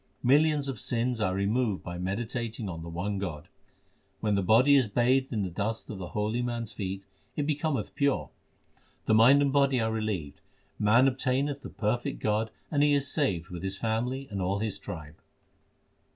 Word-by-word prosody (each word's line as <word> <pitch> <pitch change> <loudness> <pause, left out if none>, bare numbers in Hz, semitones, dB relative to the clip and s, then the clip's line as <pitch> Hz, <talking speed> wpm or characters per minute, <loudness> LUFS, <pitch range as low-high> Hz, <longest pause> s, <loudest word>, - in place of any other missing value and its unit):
Millions 145 +2 +4
of 130 -5 -4
sins 120 -1 -1
are 95 -2 +1
removed 105 +1 0
by 85 0 -6
meditating 115 +3 -3
on 85 -3 -5
the 85 - -7
one 95 +4 -3
God. 85 -7 -5 0.7
When 105 -1 0
the 100 - +2
body 115 +9 +5
is 130 -4 +4
bathed 125 +5 +2
in 110 -4 -1
the 95 - -3
dust 105 +7 -3
of 100 - -7
the 90 - -5
holy 110 +3 0
man 120 -1 -2
s 110 - -8
feet, 95 0 -5 0.3
it 145 - -1
becometh 150 -1 -1
pure; 140 -1 0 0.7
The - - +3
mind 125 +6 +7
and 140 -1 +1
body 140 -2 +3
are 110 -1 0
relieved; 105 -10 -3 0.4
man 115 +5 +5
obtaineth 135 +2 0
the - - -8
perfect 115 +3 -2
God, 110 +1 0 0.2
And 145 -2 +2
he 145 0 +4
is 140 -1 0
saved 95 - 0
with 90 -2 -6
his 95 0 -3
family 125 +5 -2
and 100 -1 -3
all 95 +2 0
his 105 0 -3
tribe. 75 -2 -8
110 Hz, 185 wpm, -28 LUFS, 100-130 Hz, 0.7 s, mind